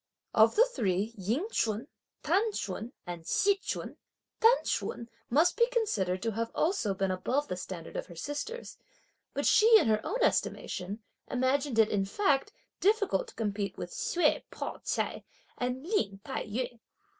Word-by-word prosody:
Of 220 +1 +5
the 470 - +7
three 215 - -1
Ying 225 - -1
Ch'un, 220 +2 0 0.4
T'an 390 +8 +2
Ch'un, 210 - -4
and 175 -2 -6
Hsi 400 0 +3
Ch'un, 385 - -5 0.4
T'an 460 +3 +5
Ch'un 235 - -2 0.2
must 305 +8 +4
be 470 - +5
considered 205 - 0
to 225 - 0
have 230 +2 -2
also 315 - +1
been 195 0 0
above 255 +10 0
the 180 - -3
standard 180 -2 -7
of - - -3
her 170 - -11
sisters, 290 - -5 0.6
but - - -1
she, 440 +2 +6
in - - +1
her 215 -1 +2
own 460 - -2
estimation, 200 +5 -1 0.3
imagined 260 0 +1
it, 220 -1 +5
in 195 -2 +1
fact, 290 - +1 0.3
difficult 425 +3 +2
to 455 - -14
compete 205 -2 -2
with - - -6
Hsüeh 355 -10 +1
Pao - - -5
ch'ai - - -2 0.4
and 250 +2 -2
Lin 215 - 0
Tai - - -4
yü. 240 +2 -3
245 Hz, 160 wpm, -30 LUFS, -, 0.6 s, the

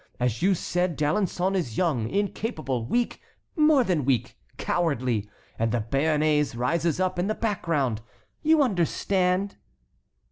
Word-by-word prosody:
As 120 -2 -1
you 190 +1 +3
said, 180 0 -1
D'Alençon 180 +4 0
is 160 - -2
young, 135 -11 +1
incapable, 190 - -2
weak, 240 - -1 0.3
more 300 -4 +5
than 180 -9 0
weak, 125 -2 0 0.2
cowardly! 125 - -1 0.3
And 115 0 +1
the 120 -1 0
Béarnais 150 -2 +2
rises 165 +6 0
up 185 -1 0
in 180 - 0
the 215 - -1
background, 160 - -1 0.4
you 315 -1 +4
understand?" 190 - 0
170 Hz, 130 wpm, -26 LUFS, 130-195 Hz, 0.4 s, more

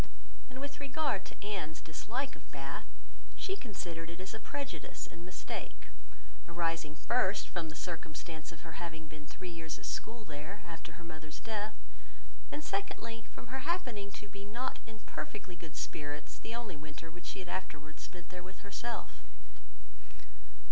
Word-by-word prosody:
And 260 0 -4
with 285 +1 -1
regard 280 -5 +4
to - - -5
Anne's 185 -7 +2
dislike 235 - +1
of 140 -4 -12
Bath, 140 0 -1 0.5
she 385 - +3
considered 175 - -1
it 170 +1 -4
as 185 - -1
a 220 - -1
prejudice 280 +4 0
and 170 - -6
mistake 180 +1 -2 0.6
arising, 165 -3 +4
first, 200 0 +6
from 170 -3 +2
the 155 - -3
circumstance 160 -2 -1
of 165 - -7
her 165 0 -4
having 160 -2 -1
been 150 -1 -6
three 185 +3 -3
years 165 -2 0
at - - -4
school 225 -1 0
there, 155 +6 -3
after 165 -1 -3
her 170 +1 -7
mother's 155 -2 -4
death; 215 -1 +1 0.8
and 300 - +1
secondly, 225 +2 +1
from 245 +1 -5
her 265 - +4
happening 255 - +3
to 205 - -4
be 200 0 -5
not 235 +6 +2
in 225 -1 -5
perfectly 190 -4 -2
good 165 -3 -6
spirits 145 -1 0
the 230 - -1
only 235 -7 0
winter 155 +2 -4
which 175 +1 -6
she - - 0
had 185 - -1
afterwards 155 -4 -1
spent 175 -2 -5
there 180 0 -3
with 185 +1 -7
herself. 235 +4 0
180 Hz, 165 wpm, -39 LUFS, 160-225 Hz, 0.8 s, first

